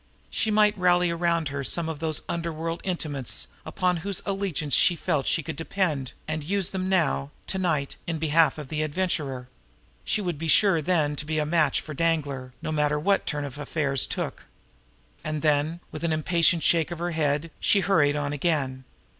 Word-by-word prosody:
She 220 - 0
might 210 0 +4
rally 180 -1 +4
around 170 -2 0
her 140 0 -3
some 165 +4 0
of 160 -3 -4
those 160 -2 -2
underworld 165 0 -3
intimates 140 - -1 0.2
upon 180 -1 +1
whose 195 +2 -2
allegiance 190 -8 -2
she 175 - +5
felt 145 -3 -1
she 160 - +1
could - - -5
depend, 160 -4 -1
and 155 -1 -3
use 190 +3 0
them 185 -1 -2
now, 70 - +1 0.2
to 190 - -3
night, 155 -7 -1
in 165 -1 -1
behalf 160 +1 +3
of 150 -4 -7
the 155 0 -1
Adventurer; 150 -6 -2 0.6
she - - 0
would 175 -7 -3
be 165 - -3
sure 170 +1 +5
then 150 -3 +1
to 150 - -4
be 155 0 -1
a 150 - +1
match 155 -2 +2
for 155 - -8
Danglar, 145 -5 -1
no - - -2
matter 150 -1 +1
what 195 +6 +1
turn 145 -1 -1
affairs 140 -1 -1
took. - - -4 0.8
And 155 0 -3
then, 155 +3 +1
with 155 - -7
an 170 - +1
impatient 165 +1 +2
shake 165 -1 +3
of 175 - -5
her 175 +1 -2
head, 155 0 0
she 200 - +4
hurried 150 -8 +3
on 145 -1 -2
again. 135 -4 -1
160 Hz, 185 wpm, -26 LUFS, 145-175 Hz, 0.8 s, she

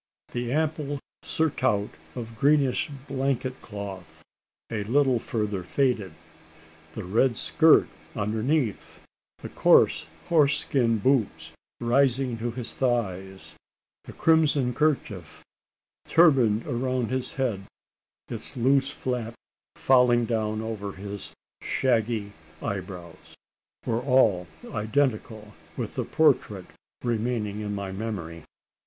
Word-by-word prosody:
The 120 0 -3
ample 150 -1 -1 0.2
surtout 130 -10 0 0.2
of 115 -1 -6
greenish 140 +4 +2 0.2
blanket 135 -1 -2
cloth, 100 -4 -8 0.5
a 105 -2 -2
little 130 +1 +3
further 105 -6 -2
faded 110 +1 0 0.8
the 110 - -6
red 115 +6 +2
skirt - - +5 0.3
underneath 110 +3 -1 0.4
the - - -8
coarse - - +4 0.2
horse 145 -4 +4
skin 120 -6 +1
boots 105 - 0 0.3
rising 125 0 +2
to 120 +1 -2
his 120 0 -5
thighs 95 -7 -2 0.5
the - - -10
crimson 150 -6 +3
kerchief 105 - -1 0.6
turbaned 130 -10 +4
around 125 -2 -1
his 130 -1 -2
head, 110 -8 -2 0.6
its - - -6
loose 135 +2 +3
flap 125 -4 -4 0.4
falling 125 -2 +4
down 110 -2 -1
over 105 -3 -5
his 100 +1 -7 0.3
shaggy 115 -5 0 0.3
eyebrows 90 -3 -7 0.5
were 115 +1 0
all 115 -9 +3 0.2
identical 110 -2 -1 0.2
with - - -4
the - - -2
portrait - - +2 0.4
remaining 115 -3 -1
in 105 -1 -3
my 100 -1 -4
memory. 95 -6 -5
115 Hz, 105 wpm, -26 LUFS, 105-130 Hz, 0.8 s, skirt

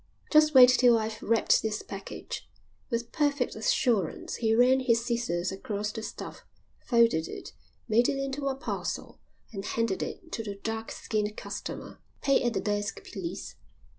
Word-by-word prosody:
"Just 305 -1 +5
wait 250 -1 +10
till 245 -2 +5
I've 220 0 -3
wrapped 230 +1 +3
this 215 -1 -2
package." 195 0 -7 0.4
With 235 -2 -2
perfect 285 -4 0
assurance 220 - 0
he 225 -1 +2
ran 250 +3 +5
his 235 -3 +2
scissors 235 -7 -1
across 205 +2 -3
the 220 - -6
stuff, - - -7 0.4
folded 230 - +3
it, - - -8 0.3
made 235 +2 +4
it 275 - -1
into 275 +1 -2
a 270 - 0
parcel, 270 - -4 0.3
and 195 -2 -5
handed 225 -2 -1
it 335 - -6
to - - -3
the 205 -2 -5
dark 225 +2 -4
skinned 210 -1 -2
customer. - - -6 0.2
"Pay 275 -1 +4
at 240 -1 +1
the - - -1
desk, 205 0 -2
please." 190 -2 -6
230 Hz, 160 wpm, -28 LUFS, 210-250 Hz, 0.4 s, wait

